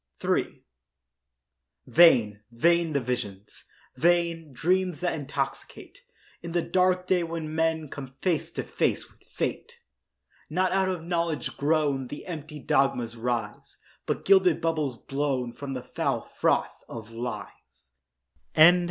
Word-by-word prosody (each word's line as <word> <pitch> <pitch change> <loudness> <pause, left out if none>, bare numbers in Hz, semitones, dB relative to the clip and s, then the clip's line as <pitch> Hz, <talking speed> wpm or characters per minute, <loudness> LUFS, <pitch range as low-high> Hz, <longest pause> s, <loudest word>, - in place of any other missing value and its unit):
III - - 0 1.2
Vain, 120 -12 +5
vain 170 +6 +2
the 140 - +2
visions—vain, 140 - -2
Dreams 180 +5 0
that 180 -1 0
intoxicate 145 -4 -5 0.4
In 170 -1 -7
the 175 - +2
dark 185 0 +2
day 185 -1 +2
when 165 -2 -4
men 160 -1 0
Come 135 -1 -9
face 175 -5 0
to - - -3
face - - -1
with - - -29
fate. - - -4 0.7
Not 185 +3 +1
out 190 0 +2
of 180 -3 -3
knowledge 170 -3 -2
grown 145 -3 +1
The 145 - -8
empty 155 -3 -7
dogmas 125 -4 +1
rise, 115 -3 -4 0.3
But - - -2
gilded 190 -4 +5
bubbles 155 -6 -1
blown 135 -3 -2
From 140 +2 -6
the 125 -1 -5
foul - - -1
froth - - -1
of 115 -1 -8
lies. 115 - -8 0.6
Cease! 160 +3 +9
155 Hz, 125 wpm, -27 LUFS, 125-170 Hz, 1.2 s, Cease